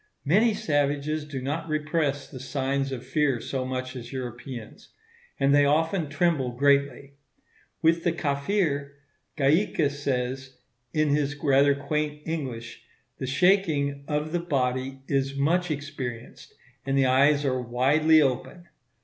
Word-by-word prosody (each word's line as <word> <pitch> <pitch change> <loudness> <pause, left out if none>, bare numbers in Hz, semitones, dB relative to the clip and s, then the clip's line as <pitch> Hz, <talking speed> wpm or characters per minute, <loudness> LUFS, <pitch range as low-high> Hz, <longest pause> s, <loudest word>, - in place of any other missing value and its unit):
Many 210 +9 +3
savages 145 -5 0
do 140 -4 -6
not 160 +4 -3
repress 150 -2 -1
the 130 - -10
signs 135 +1 -2
of 130 -2 -6
fear 135 -2 +1
so 130 +2 -3
much 130 0 -4
as 120 -2 -8
Europeans; 120 -2 -7 0.5
and 135 +1 +3
they 145 0 +6
often 160 +3 +1
tremble 150 -5 0
greatly. 140 +1 +1 0.7
With 165 +1 +3
the 170 - +2
Kafir, 140 -1 -1 0.4
Gaika 150 +1 +2
says, 130 -2 -3 0.3
in 155 -1 +1
his 145 0 +1
rather 140 -1 +3
quaint 150 +1 -3
English, 130 -8 -5 0.4
the 130 - -3
shaking 145 -3 +2
"of 150 +1 -2
the 175 - 0
body 135 -4 -2
is 135 0 0
much 175 +6 +1
experienced, 140 -6 -6 0.3
and 135 0 0
the 135 - +4
eyes 140 +3 +4
are 130 -2 0
widely 145 +6 +4
open." 145 +6 -3
140 Hz, 130 wpm, -26 LUFS, 135-155 Hz, 0.7 s, they